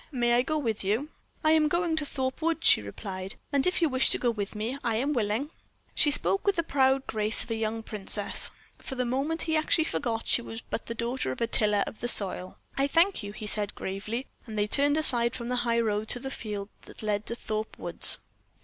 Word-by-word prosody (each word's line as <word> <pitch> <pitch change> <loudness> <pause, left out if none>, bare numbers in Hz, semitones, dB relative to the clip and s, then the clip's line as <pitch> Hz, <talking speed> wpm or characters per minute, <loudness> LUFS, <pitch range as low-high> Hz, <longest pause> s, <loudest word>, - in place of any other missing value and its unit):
May 240 -3 +1
I 240 - +4
go 310 +4 -1
with 225 -9 -2
you?" 220 +10 -1 0.3
"I 310 - +4
am 315 -1 +4
going 340 +1 0
to 300 -2 -1
Thorpe 260 +2 -3
Woods," 330 0 -1
she - - +7
replied, 185 - -7 0.2
"and 280 +4 +3
if 365 -1 +1
you - - +5
wish 260 -2 +3
to - - +6
go 240 - +1
with 210 -2 -5
me 230 +6 -3
I 230 -2 0
am 275 +6 0
willing." 235 +4 -1 0.4
She 300 - +3
spoke 390 +6 +4
with 400 - +3
the 335 - 0
proud 270 -3 +2
grace 215 0 +1
of - - -9
a - - 0
young 225 0 -3
princess. 205 -1 0 0.3
For 265 - -7
the 250 -1 -1
moment 275 +7 0
he 320 -1 0
actually 310 +1 +3
forgot 235 -7 -2
she - - +3
was 225 -1 -7
but 225 - -6
the 230 - -4
daughter 235 - -2
of 130 - -6
a - - +1
tiller 210 -3 +2
of - - -9
the 240 - -3
soil. 185 -5 -1 0.2
"I 275 +1 +1
thank 340 +4 +3
you," 205 -1 -6
he 215 +1 -8
said, 210 -1 +1
gravely; 215 +6 -4 0.2
and 215 -1 -6
they 205 - +2
turned 285 +7 +4
aside 240 -6 +4
from 235 -1 -5
the 250 - 0
high 235 0 +2
road 215 -1 -1
to 245 - 0
the 265 +1 -6
fields 210 -5 -5 0.2
that - - -12
led 210 -1 -1
to 235 - -3
Thorpe 215 -1 -5
Woods. - - +3
235 Hz, 235 wpm, -28 LUFS, 215-280 Hz, 0.4 s, she